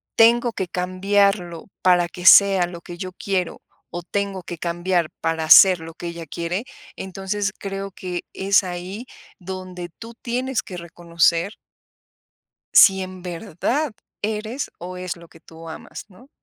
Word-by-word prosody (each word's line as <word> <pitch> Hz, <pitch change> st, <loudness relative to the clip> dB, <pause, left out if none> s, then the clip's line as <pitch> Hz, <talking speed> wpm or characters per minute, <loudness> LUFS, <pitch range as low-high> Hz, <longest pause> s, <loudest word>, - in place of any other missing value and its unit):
"Tengo 235 Hz, +1 st, +5 dB
que 190 Hz, -4 st, -3 dB
cambiarlo 185 Hz, -1 st, 0 dB, 0.2 s
para 180 Hz, -1 st, +4 dB
que 180 Hz, +1 st, -9 dB
sea 195 Hz, -2 st, +7 dB
lo 170 Hz, -1 st, -9 dB
que 175 Hz, +1 st, -10 dB
yo 185 Hz, +1 st, -5 dB
quiero, 185 Hz, -2 st, -2 dB, 0.3 s
o 175 Hz, 0 st, -5 dB
tengo 195 Hz, 0 st, -3 dB
que 175 Hz, -, -7 dB
cambiar 175 Hz, 0 st, 0 dB
para 160 Hz, -1 st, -1 dB
ser 185 Hz, -3 st, +9 dB
lo 165 Hz, 0 st, -9 dB
que 175 Hz, -, -7 dB
ella 170 Hz, -1 st, -6 dB
quiere". 170 Hz, -, -3 dB, 0.3 s
Entonces, 195 Hz, +2 st, -3 dB
creo 195 Hz, 0 st, -5 dB
que 180 Hz, -1 st, -6 dB
es 195 Hz, +1 st, +3 dB
ahí 185 Hz, +6 st, -6 dB, 0.3 s
donde 185 Hz, -1 st, -7 dB
tú 230 Hz, +1 st, -10 dB
tienes 255 Hz, +1 st, -1 dB
que 180 Hz, -, -8 dB
reconocer 170 Hz, +2 st, 0 dB, 1.2 s
si 190 Hz, -1 st, +7 dB
en 185 Hz, 0 st, -7 dB
verdad 210 Hz, -, -2 dB, 0.3 s
eres 220 Hz, +5 st, -3 dB
o 180 Hz, +1 st, -7 dB
es 180 Hz, -1 st, -4 dB
lo 170 Hz, -, -14 dB
que 165 Hz, -, -18 dB
tú 165 Hz, 0 st, -13 dB
amas, 160 Hz, -, -9 dB
¿no? 245 Hz, +9 st, -18 dB
185 Hz, 150 wpm, -22 LUFS, 175-200 Hz, 1.2 s, ser